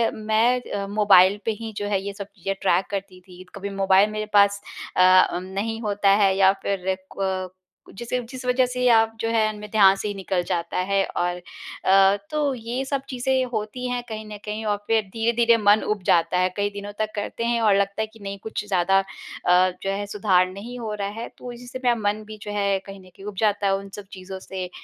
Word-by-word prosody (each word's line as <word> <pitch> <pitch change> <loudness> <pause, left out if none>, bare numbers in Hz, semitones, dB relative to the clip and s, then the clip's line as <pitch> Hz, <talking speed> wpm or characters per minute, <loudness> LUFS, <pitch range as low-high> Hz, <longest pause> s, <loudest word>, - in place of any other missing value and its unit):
मैं 220 +3 +2
अ, 200 -1 -2
मोबाइल 200 -1 +5
पे 225 - +1
ही 225 -1 -5
जो 205 - -2
है 200 -2 0
ये 200 - -4
सब 200 -1 -7
चीज़ें 195 +1 -3
ट्रैक 190 0 +2
करती 195 -2 -5
थी, 180 0 -14
कभी 200 0 -5
मोबाइल 195 +1 +3
मेरे 215 0 -3
पास 200 0 +4 0.4
अ, 185 0 +7
उम, 180 - -5
नहीं 200 +4 -3
होता 205 -2 +1
है 190 -1 +3
या 190 -1 +6
फिर 190 -1 -1 0.2
क 190 -1 -2 0.5
जिस 240 +2 -7 0.2
जिस 255 -1 -8
वज़ह 250 +1 +3
से 250 0 0
अब 225 -1 +4
जो 225 - -1
है 215 -1 +2
मेरे 210 0 -8
ध्यान 195 -3 +6
से 195 - -4
ही 205 - -2
निकल 190 -2 -2
जाता 170 -1 -2
है 195 +2 +1
और 175 0 0 0.5
अ, 195 +1 +5
तो 300 -2 0
ये 240 +2 -4
सब 275 0 -2
चीज़ें 260 0 0
होती 220 +4 -3
हैं 245 0 -1
कहीं 220 -1 -6
न - - -7
कहीं 215 +1 -4
और 205 - 0
फिर 225 -1 +2
धीरे-धीरे 230 +1 +3
मन 210 0 +4
उब 210 -2 -2
जाता 170 +1 +3
है, 185 0 +2
कई 205 0 +1
दिनों 205 0 -7
तक 215 0 -1
करते 210 +2 -4
हैं 235 0 +1
और 210 -3 +4
लगता 200 +1 0
है 220 - -1
कि 225 - -16
नहीं 200 0 -6
कुछ 220 -1 -4
ज़्यादा 195 -1 +2
अ, 185 -1 0
जो 195 - -1
है 200 +1 -2
सुधार 195 -3 +2
नहीं 220 +6 -8
हो 220 -3 -4
रहा 200 -1 -3
है। 235 - -4
तो 250 - -8
इसी 240 +1 -11
से 255 - -7
मेरा 245 -1 +3
मन 210 -1 -1
भी 215 0 -9
जो 210 - -6
है 200 -1 +1
कहीं 195 0 -9
न - - -16
कहीं 195 - -13
उब 210 -1 -6
जाता 205 -2 +1
है 195 - +3
उन 200 0 -9
सब 205 - -9
चीज़ों 190 0 -8
से, 185 -1 -6
205 Hz, 230 wpm, -23 LUFS, 195-225 Hz, 0.5 s, अ